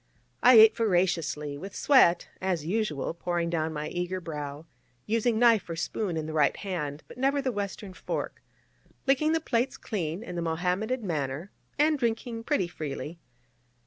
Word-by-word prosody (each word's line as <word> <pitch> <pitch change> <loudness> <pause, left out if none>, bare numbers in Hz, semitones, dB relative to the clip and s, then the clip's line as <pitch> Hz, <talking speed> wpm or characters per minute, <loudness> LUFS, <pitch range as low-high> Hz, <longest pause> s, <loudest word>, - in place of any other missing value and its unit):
I 250 0 +8
ate 220 0 +9
voraciously, 170 -8 0
with 195 +4 -8
sweat, 260 -12 +4
as 180 -5 -1
usual, 175 -7 -1
pouring 170 0 -2
down 160 -1 0
my 150 -1 -4
eager 180 +1 -3
brow, 150 -3 -6 0.4
using 230 +1 +1
knife 225 -5 +4
or 165 - -3
spoon 170 +2 -2
in 155 - -2
the 155 - -5
right 150 -2 +3
hand, 155 -7 -4
but - - -12
never 275 +2 +2
the 270 -2 0
Western 200 -2 -5
fork, - - -4 0.6
licking 275 +4 +3
the 325 - +2
plates 255 -4 -1
clean 175 -2 -3
in 180 - -7
the 170 - -2
Mohammedan 180 +9 -1
manner, 150 +1 -3 0.3
and 300 0 +3
drinking 230 -1 -2
pretty 245 -12 +1
freely. 155 0 -6
185 Hz, 160 wpm, -28 LUFS, 160-230 Hz, 0.6 s, ate